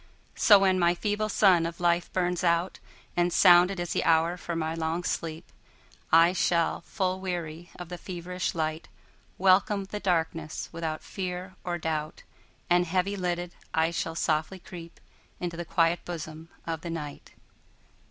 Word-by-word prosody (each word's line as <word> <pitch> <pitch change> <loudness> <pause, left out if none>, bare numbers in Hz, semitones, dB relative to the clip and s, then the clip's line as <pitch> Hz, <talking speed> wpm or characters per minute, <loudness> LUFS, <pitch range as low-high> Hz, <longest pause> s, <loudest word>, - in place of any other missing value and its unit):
So 205 - +7
when 190 -1 +3
my 175 0 +3
feeble 210 +3 -1
sun 185 -5 +4
of 170 0 -8
life 175 0 +1
burns 180 -1 0
out, 170 +1 +1 0.4
And 175 0 +2
sounded 180 +1 +6
is 175 -1 -2
the - - 0
hour 165 +1 +3
for 175 -1 -5
my 160 -1 -1
long 165 +1 -2
sleep,I 165 +1 -1
shall, 170 -2 +1
full 185 -2 -1
weary 175 -2 -5
of 175 -2 -9
the 180 -1 -7
feverish 180 0 -4
light, 155 0 -2 0.5
Welcome 195 +2 +3
the 205 +2 -6
darkness 165 -4 -1
without 165 -2 -4
fear 185 -1 -5
or 175 -1 -2
doubt, 155 -2 -3 0.4
And 175 0 +3
heavy 185 +3 0
lidded, 175 -2 -2 0.2
I 160 +1 +2
shall 165 -1 -3
softly 155 +3 0
creepInto 175 0 -10
the 175 0 -5
quiet 165 +1 +2
bosom 160 -1 -7 0.2
of 165 -2 -3
the 170 - -6
Night. 150 -3 -7
175 Hz, 150 wpm, -28 LUFS, 165-180 Hz, 0.5 s, So